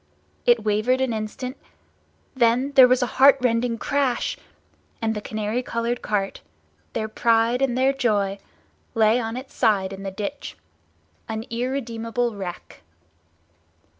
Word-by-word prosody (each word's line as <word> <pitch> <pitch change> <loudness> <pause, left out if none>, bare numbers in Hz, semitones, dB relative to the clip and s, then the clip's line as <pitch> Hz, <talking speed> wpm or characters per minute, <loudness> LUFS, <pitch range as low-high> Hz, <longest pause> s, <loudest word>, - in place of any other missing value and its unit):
It 485 - +4
wavered 215 +5 +1
an 260 -3 0
instant—then 250 +2 -3
there 265 -3 +8
was 250 0 +3
a 245 +2 -4
heartrending 245 -4 +4
crash—and 245 -4 -3
the 210 - -4
canary 215 +3 -2
coloured 235 0 -2
cart, 200 -2 -2 0.5
their 220 - -2
pride 230 +2 +2
and 255 -2 +1
their 265 +1 +3
joy, 205 -7 0 0.6
lay 220 +1 +4
on 225 0 -3
its 260 +1 -9
side 195 -3 +1
in 195 - -8
the 195 - -4
ditch, 205 +8 -6 0.7
an 220 0 -4
irredeemable 235 -1 -2
wreck. 185 -3 -8
230 Hz, 120 wpm, -23 LUFS, 215-255 Hz, 0.7 s, there